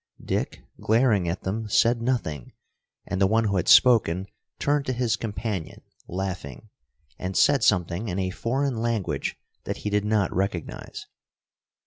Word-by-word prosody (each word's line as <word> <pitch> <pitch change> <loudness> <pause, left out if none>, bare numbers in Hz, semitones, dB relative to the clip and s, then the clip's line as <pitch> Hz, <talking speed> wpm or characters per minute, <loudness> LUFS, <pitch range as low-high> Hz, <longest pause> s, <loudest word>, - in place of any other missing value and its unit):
Dick, - - -2 0.2
glaring 110 -6 +2
at 85 - -4
them, 105 +3 -3
said 115 +3 +3
nothing, 115 - -2 0.5
and 100 -1 -3
the 95 - +5
one 110 +3 +2
who 100 -3 0
had 90 - -1
spoken 100 -8 +5 0.3
turned 145 -1 0
to 130 - 0
his 120 -2 +1
companion, 105 -5 -5 0.2
laughing, 90 -8 -5 0.5
and 95 +1 -3
said 140 -5 +4
something 90 0 +1
in 90 -2 -3
a 95 -1 -1
foreign 130 +5 -1
language 110 -11 -2 0.3
that - - -3
he 105 - -1
did 105 0 +1
not 105 -2 +1
recognize. 90 -3 -3
105 Hz, 145 wpm, -25 LUFS, 95-115 Hz, 0.5 s, the